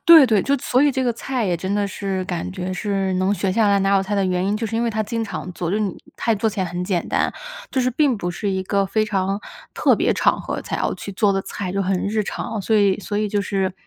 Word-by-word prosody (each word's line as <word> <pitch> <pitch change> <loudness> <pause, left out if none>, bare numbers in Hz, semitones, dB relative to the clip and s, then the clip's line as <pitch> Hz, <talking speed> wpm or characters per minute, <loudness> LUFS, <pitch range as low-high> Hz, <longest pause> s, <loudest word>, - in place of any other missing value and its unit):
对 325 -5 +9
对， 215 -5 +3
就 280 0 +2
所 250 +1 +2
以 290 - +5
这 265 - 0
个 245 -2 +1
菜 250 0 -2
也 175 -2 +1
真 190 +4 -2
的 205 -1 +1
是 190 -1 -3
感 175 -1 -3
觉 185 -1 -4
是 195 +1 -1
能 185 +2 +1
学 195 -1 0
下 210 +2 +3
来 200 - +4
拿 195 +1 +3
手 195 - +2
菜 200 +2 -2
的 200 -1 +2
原 180 0 0
因， 205 +2 +1
就 225 - -2
是 225 +1 -3
因 230 - +1
为 235 - +1
它 215 0 -1
经 225 +2 -2
常 185 - -5
做， 170 -1 -3
就 200 - +1
是 215 - 0
你 200 -3 -2 0.2
菜 230 - +1
做 220 +2 +1
起 205 -1 -4
来 185 - 0
很 175 +1 -4
简 180 -2 -1
单。 - - +1 0.4
就 260 - +1
是 255 - +1
并 275 -2 +2
不 175 -3 -3
是 200 +3 -2
一 190 -1 -1
个 200 +1 +1
非 215 +2 +1
常 195 -1 -1 0.3
特 - - +4
别 - - +2
场 - - +2
合 - - -3
才 - - -4
要 - - 0
去 - - -7
做 200 +1 +2
的 195 - 0
菜， 185 -3 -5
就 195 - 0
很 190 0 0
日 215 +1 0
常。 215 +1 -4
所 220 +3 0
以 200 -2 +3
所 205 +1 -4
以 215 - 0
就 205 0 0
是 195 -2 -1
200 Hz, 310 characters per minute, -21 LUFS, 190-220 Hz, 0.4 s, 对